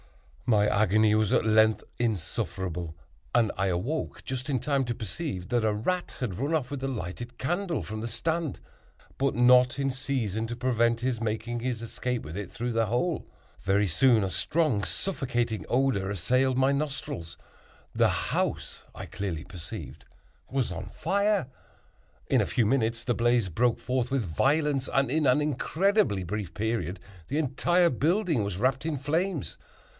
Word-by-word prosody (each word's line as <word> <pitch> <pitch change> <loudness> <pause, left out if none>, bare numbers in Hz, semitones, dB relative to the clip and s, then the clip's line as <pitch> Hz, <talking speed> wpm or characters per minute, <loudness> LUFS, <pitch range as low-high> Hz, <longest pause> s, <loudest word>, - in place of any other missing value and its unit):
My 105 -3 +4
agony 105 +1 +3
was 110 -2 +2
at - - +3
length 110 0 +4
insufferable, 90 -6 -3 0.4
and 115 -3 +4
I 95 +1 0
awoke 105 - -2
just 130 +1 -4
in 130 -3 +1
time 140 +2 +1
to 120 -1 -2
perceive 110 - -5
that 120 -1 +1
a 110 - +3
rat 175 +13 -2
had 115 -8 -2
ran 140 - -1
off 135 -4 -2
with 140 -2 -4
the 135 - -1
lighted 120 +2 -5
candle 175 - -1
from 110 +5 -5
the 115 - -3
stand, 160 +5 -2 0.6
but 135 0 +1
not 125 +1 +5
in 135 -1 +1
season 125 -5 -2
to 120 - -4
prevent 120 -2 +2
his 125 -2 -1
making 115 +2 -2
his 120 -2 -2
escape 125 +1 -3
with 75 +2 -8
it 100 -2 -5
through 120 +1 -3
the 115 -1 +2
hole. 125 - -1 0.3
Very 100 +2 +2
soon, 110 +5 +4
a - - -2
strong 145 - +1
suffocating 120 - -2
odor 125 -7 +1
assailed 125 +8 +1
my 130 +1 +4
nostrils; 140 - -4 0.6
the - - +4
house, - - -2
I - - -6
clearly 90 -6 -4
perceived, 85 -3 -8 0.5
was 130 -3 0
on 90 - -5
fire. 200 - +1 0.8
In - - +3
a - - 0
few 120 - +1
minutes 115 0 +1
the 120 - +2
blaze 120 -2 +2
broke 120 +7 +1
forth 125 -1 -1
with 135 -3 +1
violence, 135 - +1
and 135 -2 +2
in 150 -1 +2
an 125 +4 +4
incredibly 155 - +1
brief 95 -1 -4
period 105 -5 -2 0.3
the 145 - -1
entire 170 +4 +2
building 160 - +1
was 100 -3 -3
wrapped 130 +6 +1
in 160 -3 -1
flames. 160 +3 -1
120 Hz, 165 wpm, -28 LUFS, 105-140 Hz, 0.8 s, not